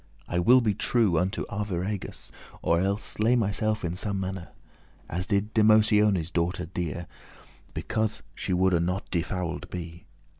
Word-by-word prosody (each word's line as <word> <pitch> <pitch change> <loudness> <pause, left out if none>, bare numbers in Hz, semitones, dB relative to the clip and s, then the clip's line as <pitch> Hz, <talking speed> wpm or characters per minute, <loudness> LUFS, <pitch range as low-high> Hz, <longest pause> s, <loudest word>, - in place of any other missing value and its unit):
I 85 - 0
will 125 +8 +6
be 110 -3 +2
true 100 -5 +2
unto 95 +2 -1
Arviragus, 100 -1 -4 0.3
Or 85 - +3
elles 100 +2 0
slay 115 +3 +2
myself 110 -2 0
in 85 +1 -2
some 100 +1 -1
mannere, 95 -2 -4 0.6
As 90 +3 -3
did 105 0 0
Demotione's 105 -5 +4
daughter 85 +1 -1
dear, 85 0 -4 0.7
Because 110 0 -1
she - - -4
woulde 90 -1 +3
not 90 +3 -2
defouled 85 -1 -2
be. 85 -1 -7
95 Hz, 140 wpm, -27 LUFS, 85-105 Hz, 0.7 s, will